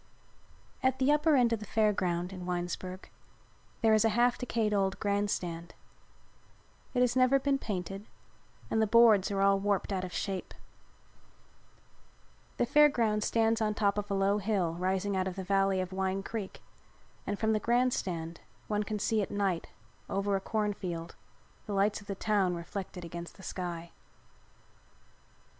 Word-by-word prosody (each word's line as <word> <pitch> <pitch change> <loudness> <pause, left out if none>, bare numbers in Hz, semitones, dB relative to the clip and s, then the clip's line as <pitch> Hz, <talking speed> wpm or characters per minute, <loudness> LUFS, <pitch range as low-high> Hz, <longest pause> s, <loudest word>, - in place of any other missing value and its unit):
At 260 0 +2
the 265 +2 +3
upper 300 +1 +4
end 240 -3 +4
of 225 - -1
the 210 - -7
Fair 215 -1 +2
Ground, 180 -1 -1
in 180 -1 -7
Winesburg, 180 +1 -4 0.7
there 225 -1 +5
is 215 - +4
a 225 - +4
half 240 +3 +3
decayed 225 -3 -1
old 195 -1 0
grand 205 0 0
stand. 170 -3 -4 1.2
It 250 - +3
has 250 -1 +3
never 255 +1 +5
been 275 0 +1
painted 195 -1 -5 0.6
and 220 - +2
the 220 - +3
boards 220 -3 +6
are 195 -1 -1
all 195 0 +4
warped 200 0 0
out 185 -1 -1
of 185 - -5
shape. 190 +1 -4 2.0
The - - +2
Fair 295 +4 +6
Ground 220 -6 +1
stands 225 0 +2
on 215 -1 +1
top 200 -2 +2
of 205 0 -5
a 200 - 0
low 195 +1 +2
hill 195 -5 0
rising 190 +3 -1
out 190 0 0
of 185 - -4
the 190 - -4
valley 195 0 +2
of 185 0 -3
Wine 190 0 -1
Creek 210 -2 -6 0.6
and 205 - -1
from 220 +1 +1
the 215 - +1
grand 245 +3 +2
stand 165 -2 -4 0.3
one 210 -1 0
can 210 0 -3
see 215 +1 +1
at 200 - -3
night, 195 -4 -1 0.4
over 200 0 0
a 195 - -1
cornfield, 190 -6 -3 0.5
the 205 - -3
lights 200 +1 +1
of 200 - -16
the 195 - -3
town 195 -3 +1
reflected 180 +1 -6
against 170 +1 -8
the 190 - -13
sky. 170 -3 -5
200 Hz, 170 wpm, -31 LUFS, 185-220 Hz, 2.0 s, boards